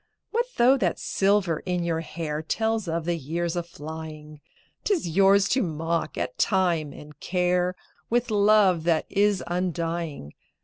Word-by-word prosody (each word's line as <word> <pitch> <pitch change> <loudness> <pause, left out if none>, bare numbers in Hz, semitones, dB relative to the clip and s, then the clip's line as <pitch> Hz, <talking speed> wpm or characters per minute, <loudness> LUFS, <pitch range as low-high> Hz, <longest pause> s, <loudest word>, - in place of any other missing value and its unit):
What 475 +2 0
though 255 +3 +5
that - - 0
silver 195 -5 +1
in 180 -2 -2
your 165 -1 -1
hair 160 -2 -4
Tells 220 +4 -1
of 165 0 -2
the 175 0 0
years 165 +3 -3
aflying? 160 -3 -7 0.4
'T 420 - +2
is 325 - -3
yours 195 +3 +4
to 260 - +2
mock 165 - -2
at - - -4
Time 175 -7 +1
and 150 -1 -13
Care 180 0 0 0.3
With 240 0 0
love 205 -4 +4
that 165 -2 +2
is 205 -1 +2
undying. 170 - -3
175 Hz, 145 wpm, -25 LUFS, 160-200 Hz, 0.4 s, though